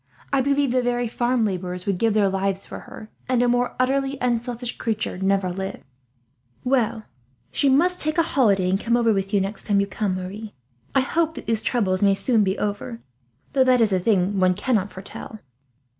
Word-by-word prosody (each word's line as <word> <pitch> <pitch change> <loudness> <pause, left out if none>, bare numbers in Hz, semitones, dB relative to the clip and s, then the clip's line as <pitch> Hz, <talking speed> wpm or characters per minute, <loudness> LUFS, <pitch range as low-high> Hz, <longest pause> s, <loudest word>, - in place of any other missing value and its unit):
I 275 - +4
believe 280 0 +1
the 255 0 +2
very 245 0 0
farm 240 0 +1
labourers 180 -2 -3
would 195 -3 -1
give 225 -2 +2
their 205 -2 +4
lives 195 0 -1
for - - -8
her, 215 - -12 0.2
and 250 -1 +3
a - - +3
more 245 0 +1
utterly 270 +2 +1
unselfish 240 0 -2
creature 220 -5 -2
never 195 -1 +1
lived." 190 +1 -5 0.8
"Well, 235 -4 +1 0.5
she 280 - +2
must 355 +7 +3
take 310 +1 -1
a 335 - +5
holiday 210 - +2
and 190 +1 +1
come 235 +2 +1
over 230 -2 +3
with 195 -1 -2
you, 205 - +3
next 195 +2 -5
time 205 -1 +3
you 200 - +2
come, 200 -1 -2
Marie. 200 +3 -7 0.4
I 270 - +5
hope 320 +4 0
that - - -8
these 225 -1 0
troubles 190 -7 0
may 200 -1 +4
soon 225 +1 +2
be 190 0 0
over, 210 +3 -4 0.5
though 270 -2 +4
that 255 -1 +4
is 220 -4 +3
a 185 - +2
thing 195 0 +1
one 185 -1 +3
cannot 205 -2 0
foretell." 195 +3 -9
220 Hz, 200 wpm, -23 LUFS, 195-250 Hz, 0.8 s, a